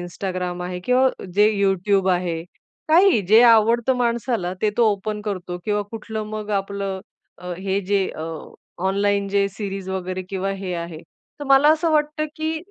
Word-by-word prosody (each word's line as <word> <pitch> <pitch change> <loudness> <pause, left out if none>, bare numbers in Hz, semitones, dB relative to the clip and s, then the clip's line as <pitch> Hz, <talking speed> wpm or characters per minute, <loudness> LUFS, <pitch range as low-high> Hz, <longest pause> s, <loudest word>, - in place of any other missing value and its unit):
Instagram 180 0 -4
आहे 180 0 -5
किंवा 255 +1 +4 0.3
जे 210 +2 +5
YouTube 195 0 +2
आहे, 170 -2 -2 0.5
काहीही, 345 - +5
जे 220 +4 +7
आवडतं 230 +3 +3
माणसाला 235 -5 -1
ते 215 - +3
तो 235 -2 +4
ओपन 210 +1 -4
करतो 180 -2 -4
किंवा 210 -1 0
कुठलं 220 -1 -5
मग 215 -1 -5
आपलं, 195 -1 -5 0.4
अ, 180 +1 -6
हे 195 +1 -1
जे 195 0 0
अ, 155 - -5 0.6
ऑनलाईन 200 0 +1
जे 200 0 +2
सीरीज 195 -1 -6
वगैरे 185 0 -3
किंवा 195 0 -2
हे 190 -2 -4
आहे. 170 -2 -6 0.4
तर - - -4
मला 275 +2 +6
असं 320 +1 0
वाटतं 300 0 +1
की 315 0 -2
200 Hz, 160 wpm, -22 LUFS, 185-230 Hz, 0.6 s, जे